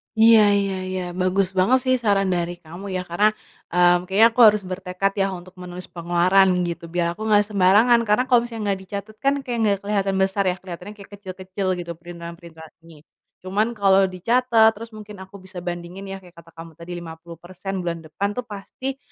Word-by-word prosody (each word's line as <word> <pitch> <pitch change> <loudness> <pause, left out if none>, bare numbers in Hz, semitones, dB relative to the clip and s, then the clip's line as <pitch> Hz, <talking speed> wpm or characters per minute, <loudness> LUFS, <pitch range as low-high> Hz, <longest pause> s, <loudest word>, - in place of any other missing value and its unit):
Iya 225 0 +7 0.2
iya 195 -1 -1
iya, 185 0 -3 0.2
bagus 185 +1 +1
banget 235 +8 +4
sih 255 0 +3
saran 195 -3 +2
dari 175 0 -2
kamu 170 +5 -10
ya. 185 - -1
Karena, 200 +5 +3 0.5
mmm, 175 0 +4
kayaknya 205 +4 +5
aku 225 - -6
harus 210 -1 +3
bertekad 185 +1 -2
ya 195 - +2
untuk 180 +1 -12
menulis 180 0 -9
pengeluaran 175 +3 +3 0.2
gitu 170 0 -6
biar 175 -1 +1
aku 215 - -11
nggak 210 -1 +4
sembarangan, 210 +5 +5
karena 210 +4 +3
kalo 245 - +6
misalnya 230 -2 -6
nggak 195 - -2
dicatat 200 +2 -7
kan 275 +1 +3
kayak 245 -3 -3
nggak 200 -1 +2
keliatan 200 -1 0
besar 195 +1 0
ya. 180 - -1
Kelihatannya 180 +2 -9
kayak 200 0 -14
kecil-kecil 190 0 -6 0.2
gitu 170 - -7
printilan-printilan 170 -2 -11
ini. 165 -2 -15 0.5
Cuman 205 +4 +1
kalo 195 -2 +4
dicatat 230 +4 +3
terus 230 +2 -10
mungkin 210 -2 -10
aku 190 +1 -16
bisa 190 -1 -12
bandingin 175 +2 -6
ya, 195 - -5
kayak 180 -1 -17
kata 165 0 -15
kamu 165 0 -10
tadi 170 +1 -9
50% 170 +3 -9
bulan 170 -1 -3
depan 180 +6 -3
tuh 250 +1 -5
pasti 255 +6 -6
190 Hz, 190 wpm, -22 LUFS, 175-210 Hz, 0.5 s, Iya